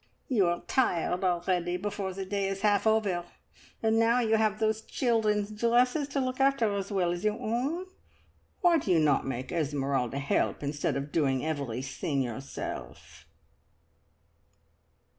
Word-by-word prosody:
"You 210 -9 +3
are 175 0 0
tired 180 -7 0
already 175 0 0
before 200 -1 -3
the 190 +1 -5
day 200 0 -1
is 195 0 -3
half 205 0 +3
over, 205 -5 +2 0.6
and 225 0 +3
now 230 +2 +4
you 225 -2 +2
have 215 -1 +2
those 220 0 0
children's 215 -4 0
dresses 245 +6 +2
to 275 0 -2
look 255 0 -2
after 270 -6 +3
as 200 0 -3
well 180 -3 +1
as 175 +2 -4
your 215 0 +1
own! 260 +10 -1 0.8
Why 345 -2 +5
do 245 - -5
you 175 - +5
not 150 -4 +2
make 130 -1 -4
Esmeralda 140 -5 -1
help, 140 +1 0
instead 145 +1 -1
of 140 +1 -5
doing 135 -4 +1
everything 135 -1 -2
yourself?" 125 +3 -7
195 Hz, 145 wpm, -29 LUFS, 155-225 Hz, 0.8 s, Why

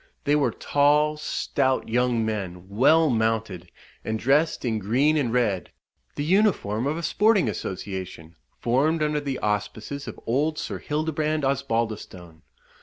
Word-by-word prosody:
They 145 - +2
were 145 -2 +2
tall, 150 +1 +2
stout 135 -3 -1
young 120 -1 +1
men, 95 -5 -4
well 150 +10 +4
mounted, 110 -6 -1 0.3
and 110 - -2
dressed 140 +6 +1
in 110 -3 0
green 130 +10 +2
and 135 -7 0
red, 110 -7 0 0.5
the 145 - -2
uniform 155 - +2
of 155 +3 -1
a 170 - -5
sporting 210 +3 +3
association, 95 -4 -5 0.2
formed 150 +7 +1
under 150 0 0
the 140 -3 -3
auspices 105 +6 -3
of - - -7
old 150 +6 0
Sir - - -4
Hildebrand 155 0 -1
Osbaldistone. 115 -11 -3
130 Hz, 135 wpm, -25 LUFS, 110-150 Hz, 0.5 s, well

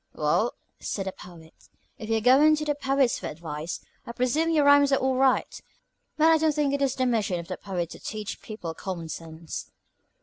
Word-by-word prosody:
"Well," - - +1 0.2
said 195 - -3
the 190 - -2
Poet, 165 -3 -14 0.5
"if 220 - -7
you're 225 -1 +1
going 275 +6 +6
to 305 0 -4
the 295 - +1
poets 275 -3 +1
for - - -5
advice, 155 +1 -6 0.2
I 235 - -8
presume 255 +7 +1
your 305 -3 +3
rhymes 285 0 +6
are - - +5
all 265 0 +1
right. 265 0 +1 0.6
But 310 - +4
I 325 - +6
don't 310 -1 +2
think 290 -2 +1
it 280 - -1
is 270 -2 +1
the 260 - 0
mission 215 -7 0
of 170 - -8
the 185 - -5
poet 180 -4 -4
to - - -10
teach 215 -1 -6
people 195 -7 -6
common 170 -2 -6
sense." 160 0 -7
235 Hz, 205 wpm, -26 LUFS, 175-280 Hz, 0.6 s, going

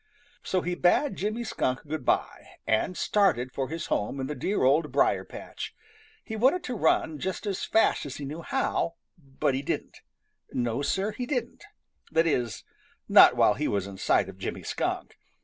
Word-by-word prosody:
So 185 - 0
he 180 +1 -2
bade 180 +11 +2
Jimmy 215 +4 -2
Skunk 130 - -2
good 155 +1 -4
by, - - -1
and 110 +11 +1
started 130 - +2
for 135 -1 -3
his 165 +2 -4
home 105 +7 -1
in 130 - -2
the 150 - -3
dear 195 +4 -1
Old 145 +3 +3
Briar 100 -8 +2
patch. - - -8 0.5
He 220 - -6
wanted 265 +11 +3
to 250 - -4
run 160 -4 +1
just 190 +7 -3
as 200 -3 -2
fast 220 -8 +2
as 135 - -6
he 145 - -6
knew 150 +4 -6
how, 170 0 -1 0.2
but 135 -2 -1
he 130 - -1
didn't. 140 - -4 0.5
No, 120 +1 -1
Sir, 195 +8 0
he 245 +3 -5
didn't. 245 - -3 0.5
That 165 +1 +3
is, 125 -8 -1 0.4
not - - +8
while 105 - +5
he 150 +7 -2
was 100 -2 0
in 100 -1 -9
sight 95 - +2
of 95 -1 -11
Jimmy - - -4
Skunk. - - -3
155 Hz, 185 wpm, -27 LUFS, 130-200 Hz, 0.5 s, not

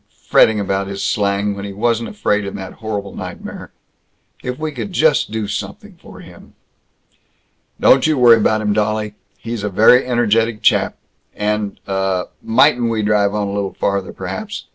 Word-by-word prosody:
Fretting 110 -1 +4
about 100 -1 -1
his 100 0 -5
slang, 100 0 0
when 100 - -7
he 100 -1 -6
wasn't 115 +2 -1
afraid 105 - 0
in 100 - -6
that 95 -1 -7
horrible 100 -3 -4
nightmare. - - -8 0.7
If 125 0 -4
we 155 0 -3
could 190 +6 -6
just 155 - +2
do 110 -1 -3
something - - -6
for - - -13
him!" - - -15 1.2
"Don't 130 +3 +5
you 155 -2 +1
worry 120 -2 +7
about 110 0 +1
him, 105 -1 0
dolly. 105 0 -1 0.2
He's 115 -2 -5
a 105 - -1
very 110 +6 +5
energetic 115 -2 +1
chap. - - +2 0.4
And 105 -1 -2
Uh 95 -2 -1 0.2
Mightn't 120 0 +3
we 110 -2 -1
drive 105 -1 +2
on 105 -1 -1
a 100 - -4
little 100 -1 -3
farther, 100 -1 -1
perhaps? - - -6
105 Hz, 165 wpm, -18 LUFS, 100-115 Hz, 1.2 s, worry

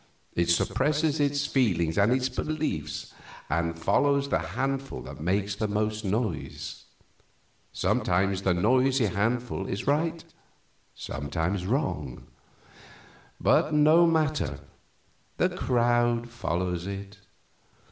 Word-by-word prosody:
It 85 0 0
suppresses 150 - +1
its 145 0 +1
feelings 85 - +1
and 100 +3 +3
its 130 0 +2
beliefs 150 - -3 0.4
and 85 +2 0
follows 140 +10 +2
the - - +2
handful 135 +2 -3
that - - -9
makes 100 +4 0
the 105 +2 -2
most 105 +1 -1
noise. 105 - -3 0.9
Sometimes 95 +2 +1
the 95 -2 +2
noisy 130 +6 +3
handful 110 +1 -1
is 100 - -4
right, 160 +4 0 0.7
sometimes 85 +7 -3
wrong; 85 - -2 1.1
but 150 - +3
no 155 +3 +6
matter, 155 - 0 0.8
the - - +3
crowd 120 -1 +1
follows 90 -6 -2
it. 100 0 -7
110 Hz, 105 wpm, -27 LUFS, 90-135 Hz, 1.1 s, no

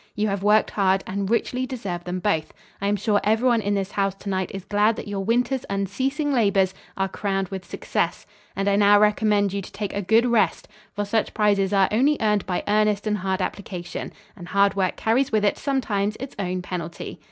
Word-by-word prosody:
You 210 +1 0
have 195 -1 -2
worked 210 +2 +3
hard 195 -1 +2
and 195 +1 -3
richly 250 +2 0
deserve 195 -9 -5
them 180 +1 -3
both. 175 -5 -1 0.3
I 200 - 0
am 205 - +2
sure 205 0 +1
everyone 225 +2 +3
in 205 0 0
this 195 0 -2
house 195 -1 0
to 200 +1 -8
night 190 -1 -1
is 195 -2 -7
glad 210 +2 +2
that - - -7
your 200 -1 -3
winter's 245 +4 +1
unceasing 260 - -1
labors 200 -6 +2 0.2
are 195 0 +1
crowned 195 -1 -2
with 190 -2 -5
success, 170 - -2 0.3
and 195 0 -1
I 200 0 +3
now 205 0 +6
recommend 210 -1 +2
you 200 - -2
to - - -11
take 205 -2 -4
a 200 - -1
good 225 +5 +3
rest, 225 -8 +1 0.3
for 205 - -1
such 215 +2 -1
prizes 205 -2 +2
are 195 -2 +4
only 275 +7 +3
earned 210 -3 +1
by 180 -2 -1
earnest 210 0 +2
and 210 -1 0
hard 190 0 -1
application, 180 -3 -5 0.2
and 175 -4 -10
hard 200 +1 +3
work 190 -2 0
carries 250 +5 +1
with 215 -2 +2
it, 205 - +2
sometimes, 215 -7 -1
its 270 +1 -7
own 185 -1 -2
penalty." 170 -2 -6
205 Hz, 210 wpm, -24 LUFS, 195-215 Hz, 0.3 s, now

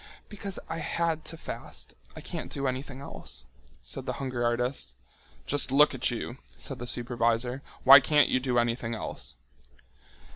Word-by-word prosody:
"Because 200 -3 -4
I 165 0 -3
had 165 0 0
to 165 - -3
fast. - - -7 0.2
I - - -7
can't - - -5
do 140 -1 -2
anything 130 +1 -3
else," 70 - -7 0.4
said - - -6
the - - 0
hunger 130 -3 -2
artist. 120 +3 0 0.5
"Just 145 -2 +2
look 145 +2 +6
at 130 -1 +1
you," 120 +1 -4 0.2
said 135 -2 -3
the 120 - -5
supervisor, 120 +1 +1 0.2
"why 135 +2 +11
can't 145 +2 +4
you 130 - +2
do 125 -1 0
anything 120 -1 +1
else?" 110 - -5
130 Hz, 155 wpm, -29 LUFS, 120-145 Hz, 0.5 s, why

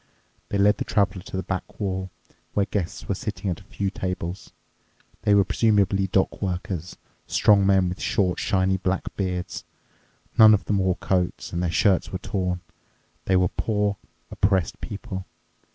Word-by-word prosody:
They 100 - 0
led 105 +1 +4
the - - 0
Traveler 100 -3 +1
to 95 - -5
the 95 - -2
back 95 -1 -5
wall, 95 -2 -2 0.5
where 100 - +3
guests 95 -3 -3
were - - +1
sitting 100 -2 -3
at 90 - -4
a - - -15
few 100 0 -3
tables. 90 -1 -4 0.7
They 105 -2 +4
were 100 -1 +5
presumably 100 -2 +2
dock 95 +1 0
workers, 90 -2 -3 0.3
strong 100 -2 +4
men 95 -2 +4
with 90 +1 -4
short, 90 -3 +1
shiny, 95 0 +1
black 95 0 -2
beards. 90 -2 -3 0.8
None 110 -1 +9
of 100 - -4
them 100 -1 +1
wore 95 -1 +2
coats, 90 -3 -1
and 85 - -1
their 90 - 0
shirts 95 +2 +2
were 95 - -2
torn. 90 -2 -2 0.6
They 95 - +2
were 90 -1 +3
poor, 105 -2 0 0.3
oppressed 95 -4 +1
people. 95 -3 -6
95 Hz, 165 wpm, -25 LUFS, 90-100 Hz, 0.8 s, None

